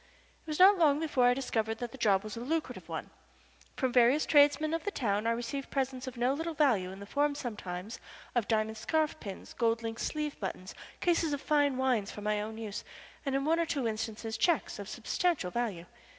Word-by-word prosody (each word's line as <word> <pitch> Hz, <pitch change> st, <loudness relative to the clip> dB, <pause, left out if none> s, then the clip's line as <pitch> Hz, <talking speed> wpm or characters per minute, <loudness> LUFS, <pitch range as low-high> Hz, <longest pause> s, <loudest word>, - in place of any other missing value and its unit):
It -, -, -33 dB
was 305 Hz, -1 st, -2 dB
not 385 Hz, +1 st, +7 dB
long 295 Hz, -3 st, +4 dB
before 295 Hz, -6 st, +2 dB
I 245 Hz, 0 st, +5 dB
discovered 225 Hz, -4 st, -1 dB
that 240 Hz, -1 st, -5 dB
the 265 Hz, -, -10 dB
job 200 Hz, -4 st, +3 dB
was 215 Hz, -1 st, -6 dB
a -, -, -5 dB
lucrative 310 Hz, +6 st, -3 dB
one. -, -, -5 dB, 0.7 s
From 260 Hz, -3 st, 0 dB
various 250 Hz, +5 st, +5 dB
tradesmen 295 Hz, +1 st, +4 dB
of 330 Hz, -, -1 dB
the 410 Hz, -, -1 dB
town 215 Hz, -, -1 dB
I -, -, +3 dB
received 240 Hz, +4 st, -3 dB
presents 265 Hz, -1 st, -2 dB
of 255 Hz, -1 st, -6 dB
no 245 Hz, +3 st, +2 dB
little 325 Hz, +2 st, -3 dB
value 240 Hz, -12 st, +3 dB
in 190 Hz, +1 st, -9 dB
the 200 Hz, -, -8 dB
form 285 Hz, +6 st, +1 dB
sometimes 210 Hz, -5 st, -5 dB, 0.3 s
of 240 Hz, -4 st, 0 dB
diamond 220 Hz, 0 st, 0 dB
scarf 310 Hz, +7 st, 0 dB
pins, 195 Hz, -3 st, -8 dB
gold 230 Hz, -1 st, +1 dB
link 225 Hz, 0 st, -4 dB
sleeve 300 Hz, -1 st, -3 dB
buttons, 190 Hz, -1 st, -5 dB, 0.3 s
cases 335 Hz, -3 st, +2 dB
of 285 Hz, -, -2 dB
fine 290 Hz, -3 st, +2 dB
wines 250 Hz, -6 st, +1 dB
for 210 Hz, -, -8 dB
my 210 Hz, 0 st, 0 dB
own 220 Hz, +1 st, -5 dB
use, 215 Hz, -3 st, -5 dB, 0.4 s
and 270 Hz, -, +1 dB
in 275 Hz, 0 st, 0 dB
one 325 Hz, +2 st, +3 dB
or 335 Hz, -, +2 dB
two 280 Hz, -7 st, -1 dB
instances 220 Hz, 0 st, -3 dB
checks 345 Hz, -2 st, +1 dB
of -, -, -6 dB
substantial 335 Hz, -, -1 dB
value. 210 Hz, -8 st, -2 dB
245 Hz, 210 wpm, -31 LUFS, 220-295 Hz, 0.7 s, not